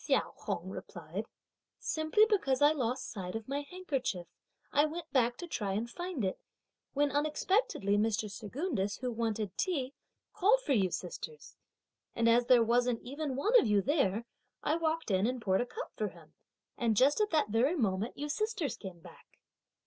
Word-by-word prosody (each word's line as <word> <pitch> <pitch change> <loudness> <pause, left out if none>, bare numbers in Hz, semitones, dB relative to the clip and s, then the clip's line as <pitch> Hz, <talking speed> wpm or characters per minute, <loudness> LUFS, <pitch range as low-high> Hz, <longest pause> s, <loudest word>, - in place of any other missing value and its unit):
Hsiao - - +1
Hung - - -4
replied; - - -6 0.5
"simply 315 +7 +3
because 370 - +1
I 290 +1 +6
lost 255 -4 -1
sight 190 -4 -5
of 225 -1 -5
my 280 +2 -1
handkerchief, 270 - -2 0.5
I 290 +1 +5
went 330 +2 -4
to - - -49
the - - -36
back 245 -2 +3
to 350 - -6
try 205 - -2
and 220 +4 -1
find 345 - -3
it, 185 - -2 0.5
when 285 0 +2
unexpectedly 295 - +1
Mr. 215 0 +1
Secundus, 205 - -2
who 250 -1 -3
wanted 220 -4 -2
tea, 280 -8 0 0.4
called 425 +5 +4
for 285 - +1
you 195 -6 +3
sisters; 460 - -6 0.6
and 230 0 +2
as 235 +1 +4
there 245 -2 +7
wasn't 240 +1 +2
one - - -14
even 280 0 -3 0.2
of - - +1
you 210 -1 +4
there, 235 - +1 0.4
I 305 - +2
walked 325 -5 -1
in 190 +3 +3
and 250 0 -1
poured 190 -3 +2
a 245 - -2
cup - - -6
for - - -1
him, - - -14 0.5
and 230 -4 +2
just 280 - +5
at 420 - +2
that 305 -9 +2
very 245 - +3
moment 210 - -1
you 295 - -3
sisters 415 - -1
came 185 -4 -9
back." 175 -1 -16
255 Hz, 180 wpm, -32 LUFS, 215-315 Hz, 0.6 s, there